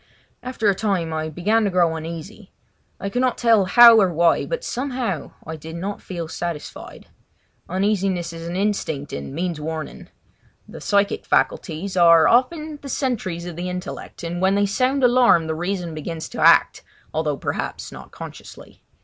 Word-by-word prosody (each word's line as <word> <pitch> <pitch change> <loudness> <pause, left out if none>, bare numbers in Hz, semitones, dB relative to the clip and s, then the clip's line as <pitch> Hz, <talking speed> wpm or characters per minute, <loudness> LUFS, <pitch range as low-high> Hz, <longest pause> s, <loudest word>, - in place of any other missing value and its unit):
After 250 -3 -2
a 200 - +5
time 190 -5 -1
I 155 0 -2
began 205 +8 +1
to - - +1
grow 175 -3 +2
uneasy. 170 +6 -8 0.5
I - - -4
could 245 +5 -1
not 255 -2 +1
tell 225 -5 +4
how 235 +2 +8
or 190 -2 +2
why, 170 0 +2
but - - -3
somehow 250 - -3
I 160 - -5
did 160 +2 -9
not 195 +4 -5
feel 170 -3 -6
satisfied. 165 -1 -7 0.6
Uneasiness 190 -2 0
is 165 0 -7
an 170 - -4
instinct 185 -8 -2
and 70 0 -5
means 165 +1 -3
warning. 160 0 -6 0.6
The - - -11
psychic 200 0 +1
faculties 190 - -1
are 170 -2 +6
often 305 +5 +1
the 275 - -8
sentries 205 -11 -2
of 175 -2 -7
the 180 +2 -4
intellect, 180 0 -7
and 170 +1 -4
when 190 +1 +3
they 205 0 +2
sound 255 +7 0
alarm 245 -9 +5
the 160 - -2
reason 175 0 -3
begins 160 +1 -5
to - - -6
act, - - +5 0.3
although 150 -2 -1
perhaps - - -4
not - - -11
consciously. - - -11
185 Hz, 165 wpm, -22 LUFS, 165-220 Hz, 0.6 s, how